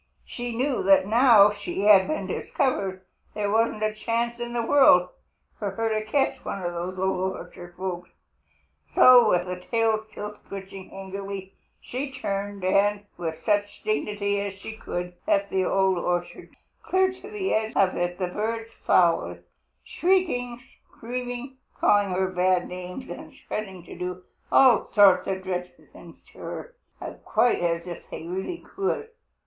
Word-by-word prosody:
She 240 -1 -5
knew 260 +2 0
that, 195 0 +5
now 220 -2 +6
she 205 -1 -5
had 200 -2 +6
been 310 - -2
discovered, 195 -9 -2 0.3
there 205 -1 -1
wasn't 220 -1 +1
a 215 0 +1
chance 235 +2 -2
in 240 0 -4
the 240 -1 -1
world 230 -10 +6 0.5
for 205 - -2
her 225 +3 -2
to 215 -1 -1
catch 275 +3 0
one 195 - -5
of 175 0 -2
those 180 +2 -4
Old 190 0 0
Orchard 175 -1 -11
folks. 180 -1 -4 0.9
So, 250 -1 +8
with 180 0 -1
tail 225 -2 +1
still 210 0 -7
twitching 195 -1 -8
angrily, 195 0 -7 0.3
she 270 +3 -5
turned 200 -5 -4
and, 200 +2 +2
with 165 -2 -5
such 205 -1 0
dignity 205 -1 -1
as 200 -1 -4
she 210 +3 -8
could, 180 -4 -5
left 200 0 +1
the 190 -1 +1
Old 190 -1 +2
Orchard. 175 0 -3 0.3
Clear 375 0 +2
to 390 +2 -12
the 415 -3 -2
edge 220 0 0
of 190 -2 +3
it 175 0 -2
the 185 - -1
birds 225 +4 -3
followed, 170 -2 +2 0.4
shrieking, 335 -10 0 0.3
screaming, 245 +2 -6 0.2
calling 205 -1 +4
her 185 +1 0
bad 180 0 +2
names, 180 +8 -7
and - - -9
threatening 190 -4 -5
to - - -11
do 180 +1 -5 0.3
all 255 -4 +5
sorts 200 -3 +6
of 190 -1 -2
dreadful 180 -1 -5
things - - -13 0.2
to - - -16
her, - - -7 0.5
quite 245 - +2
as 170 -1 -1
if 175 -2 -7
they - - -7
really 190 - -4 0.2
could. 415 +3 -1
200 Hz, 155 wpm, -25 LUFS, 185-235 Hz, 0.9 s, So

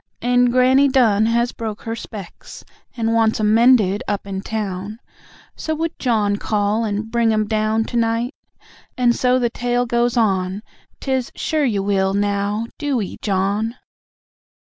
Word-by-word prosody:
And 245 0 +3
Granny 260 +3 +4
Dunn 225 -6 +3
has 235 +1 +1
broke 220 -2 -6
her 225 0 -4
specs, 205 -5 -10 0.3
And 225 -1 0
wants 225 -1 +2
'em 210 0 +2
mended 225 -4 +4
up 205 -1 -2
in 190 -1 -4
town, 205 -1 -4 0.6
So 315 - -3
would 325 +1 -3
John 210 -5 +1
call 210 +1 0
and 215 +1 -3
bring 235 -1 +2
'em 215 0 +1
down 215 +1 +1
To 240 - -4
night...? 230 +3 0 0.6
and 240 -1 +3
so 250 0 +2
the 240 -2 0
tale 245 +1 -1
goes 240 +1 0
on, 190 -2 0 0.4
'Tis, 265 -2 -1
"Sure 310 -2 0
you 205 -6 0
will, 195 -1 +1
now 205 +2 0
DO 285 -4 0
'ee, 200 - -5
John." 205 +3 -1
225 Hz, 155 wpm, -20 LUFS, 205-245 Hz, 0.6 s, Granny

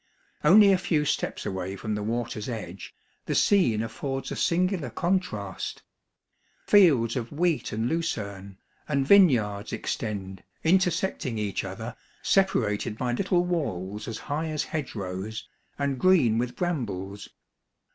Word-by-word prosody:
Only 200 +6 +7
a 185 - +2
few 160 -5 +1
steps - - -2
away 95 0 -3
from 110 +2 -4
the 105 - -2
water's 115 0 -3
edge> 100 -6 -6 0.4
the - - -1
scene 120 - +3
affords 135 +3 -4
a - - -2
singular 180 -4 +1
contrast; 115 - -2 0.8
fields 145 - +5
of 120 -3 -3
wheat 165 +1 0
and 110 +2 -1
lucerne, 100 - -3 0.3
and 140 -2 +1
vineyards 120 - +4
extend, 95 -4 -4 0.2
inter 180 +2 +4
secting 165 -9 -2
each 105 -3 -2
other, 110 +5 -6 0.3
separated 110 - +1
by 125 0 -1
little 180 +5 +1
walls 105 - -3
as 115 -2 -4
high 150 +2 -3
as 155 -1 -1
hedgerows, 105 -8 -5 0.3
and 140 -2 -1
green 140 -12 +4
with 125 0 -2
brambles. 105 - -3
120 Hz, 130 wpm, -27 LUFS, 105-170 Hz, 0.8 s, Only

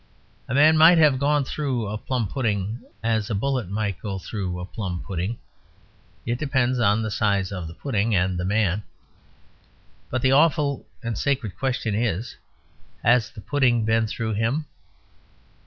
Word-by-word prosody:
A 130 - -2
man 155 +3 +6
might 165 +2 +8
have 150 -5 +5
gone 145 0 +2
"through" 130 -6 -2
a 105 +1 -4
plum 120 0 -2
pudding 105 -2 -2 0.2
as 110 -1 0
a 110 - -1
bullet 125 -2 -1
might 100 -3 -2
go 100 -3 -4
through 95 -2 -4
a 90 - -5
plum 90 -3 -5
pudding; 95 +4 -3 0.9
it 120 +1 -2
depends 130 -4 +1
on 110 -1 +3
the 110 - -3
size 100 -3 +1
of 90 -4 -5
the 80 - -10
pudding 110 -4 0
and 90 -1 +1
the - - -2
man. 100 0 +1 1.3
But 130 0 -2
the 130 - +4
awful 145 -1 +2 0.2
and 115 -1 -2
sacred 130 -5 -1
question 125 -5 -1
is 110 +1 -1 0.7
"Has 120 -1 +4
the 105 - -11
pudding 125 -3 +2
been 110 0 +2
through 110 0 -3
him?" 115 +9 0
115 Hz, 160 wpm, -24 LUFS, 100-130 Hz, 1.3 s, might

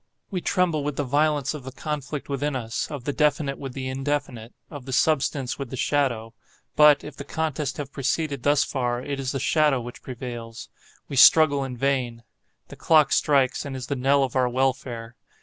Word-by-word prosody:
We 185 -2 -2
tremble 175 -6 +1
with 145 -1 -3
the 145 - -1
violence 145 0 +1
of 150 -4 -8
the 130 - -7
conflict 145 +1 -5
within 140 +1 -2
us,—of 120 +3 -4
the 145 - -2
definite 145 -2 +1
with 135 -2 -6
the 130 -1 -5
indefinite—of 135 -1 -5
the 135 - -6
substance 135 -2 +1
with 135 -3 -5
the 130 - -6
shadow. 120 -6 0 0.4
But, 150 -1 +6
if 150 - -9
the - - -7
contest 150 -1 -3
have 145 -3 -6
proceeded 140 0 -1
thus 145 +1 +3
far, 125 -2 -2
it 140 0 -4
is 130 -2 -2
the 135 - -3
shadow 150 -1 +2
which 120 0 -9
prevails,—we 120 +1 -9
struggle 145 0 +7
in 130 -2 -6
vain. 125 -3 -1 0.5
The - - -10
clock 155 -3 +4
strikes, 140 -4 +2
and 140 -2 -6
is 130 -2 -5
the 140 - -2
knell 135 +2 +3
of 130 -1 -3
our 130 -1 +2
welfare. 125 -2 -2
135 Hz, 185 wpm, -24 LUFS, 125-145 Hz, 0.5 s, struggle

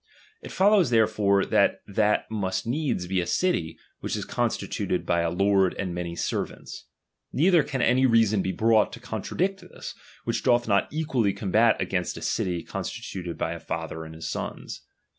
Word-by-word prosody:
It - - -9
follows 195 - +4
therefore 105 -4 +3
that - - +2
that 105 +1 +1
must 95 -3 -2
needs 125 - -1
be 95 0 0
a 85 - -4
city, 85 - 0 0.2
which - - -3
is - - -4
constituted - - -2
by 85 - +1
a 85 - 0
lord 95 +1 +2
and 95 -3 -3
many 85 -1 -4
servants. - - -4 0.5
Neither 170 +3 +4
can 135 -4 -2
any 130 +1 +4
reason 110 -4 +3
be 95 - -1
brought 110 +1 +3
to - - -8
contradict 195 +2 -2
this, 180 - -9 0.3
which - - -1
doth 120 -2 +2
not 100 -2 +2
equally 135 -10 0
combat 110 +3 +2
against 90 -2 -2
a 80 - -7
city 90 -1 -1
constituted 90 -3 -5
by 80 - -2
a 85 - -7
father 80 0 -5
and 80 0 -10
his 80 0 -6
sons. - - -5
100 Hz, 170 wpm, -26 LUFS, 90-120 Hz, 0.5 s, follows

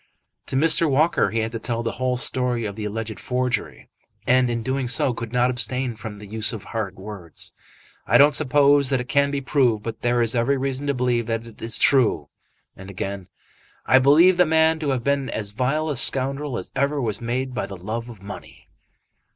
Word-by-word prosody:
To - - -4
Mr. 160 +3 +4
Walker 150 +5 +2
he 115 0 -1
had 110 0 -3
to 115 - -5
tell 115 0 -3
the 115 - -2
whole 125 -1 +1
story 125 -2 -1
of 100 -2 -5
the 105 -1 -5
alleged 110 -1 -5
forgery, 125 -1 -3 0.4
and 130 0 +3
in 115 -1 -2
doing 130 +1 -2
so 125 +1 +1
could 115 -1 -6
not 125 0 +2
abstain 125 0 0
from 105 0 -8
the 105 - -11
use 110 +2 -1
of 110 - -7
hard 110 -5 -4
words. 95 -4 -5 0.5
"I - - +5
don't 145 +1 +6
suppose 145 -1 +3
that 135 -2 +1
it 125 - -5
can 140 +1 +2
be 140 -1 -2
proved, 125 -5 +1
but 115 0 -6
there 120 0 +1
is 115 - -1
every 125 +3 +1
reason 135 +1 -3
to 140 - 0
believe 120 -2 0
that 115 0 -2 0.2
it's 115 0 -2
true." 105 - +2 0.5
And 95 +1 -11
again 95 -1 -5 0.6
"I 130 - +5
believe 160 +7 +5
the 180 - +5
man 160 0 +3
to 150 -3 -2
have 130 -3 -1
been 140 -1 0
as 105 -2 -4
vile 135 +8 -1
a 150 - -2
scoundrel 135 +1 +1
as - - -7
ever 140 +2 0
was 115 -5 -2
made 125 +2 -2
by - - -3
the 100 - -8
love 115 +6 -5
of 110 -5 -12
money." 100 +1 -11
125 Hz, 210 wpm, -23 LUFS, 110-140 Hz, 0.6 s, don't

